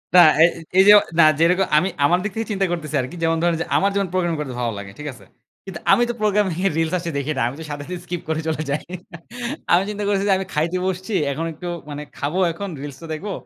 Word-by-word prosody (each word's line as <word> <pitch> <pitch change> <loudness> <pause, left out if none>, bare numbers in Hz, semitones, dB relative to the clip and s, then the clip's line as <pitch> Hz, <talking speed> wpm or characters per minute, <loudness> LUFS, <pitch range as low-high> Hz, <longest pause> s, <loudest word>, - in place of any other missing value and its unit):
না - - +10 0.2
এই - - +8 0.3
এইযে, 195 +2 +8 0.3
না - - +9 0.2
যেরকম 180 +3 +3
আমি 180 +5 +2 0.2
আমার 175 +5 +3
দিক 210 - -2
থেকে 225 0 -3
চিন্তা 195 -1 +1
করতেছি 155 -3 -3
আরকি। 130 +7 -7
যেমন 165 0 +2
ধরেন 170 0 +2
যে - - -1
আমার 200 - +3
যেমন 200 -1 +1
প্রোগ্রামিং 175 -3 0
করতে 135 -4 -4
ভালো 120 -2 -1
লাগে। 100 -1 -8
ঠিক 150 - -6
আছে? 130 - -16 0.4
কিন্তু 185 -4 -7
আমি 240 - +5
তো - - 0
প্রোগ্রামিং 205 -3 +2
এর - - 0
রিলস 160 +1 0
আছে 170 0 -4
দেখি 140 +2 -2
না। - - 0
আমি 130 - -8
তো - - -6
সাথে, 145 0 -5
সাথে, 180 +1 -4
স্কিপ 175 -1 -4
করে 160 0 0
চলে 155 -1 -1
যাই 145 +2 -1 0.9
আমি 175 +2 +5
চিন্তা 210 0 -4
করছি 200 -1 +1
যে - - +6
আমি 190 - -3
খাইতে 165 +4 0
বসছি। 190 +3 -3 0.2
এখন 155 +4 -3
একটু 175 +3 -8 0.2
মানে 145 0 -5
খাবো 150 +6 -2
এখন 195 +4 -6
reels 140 -2 -7
টা 165 - -8
দেখবো। 195 +7 -5
170 Hz, 245 wpm, -21 LUFS, 155-195 Hz, 0.9 s, না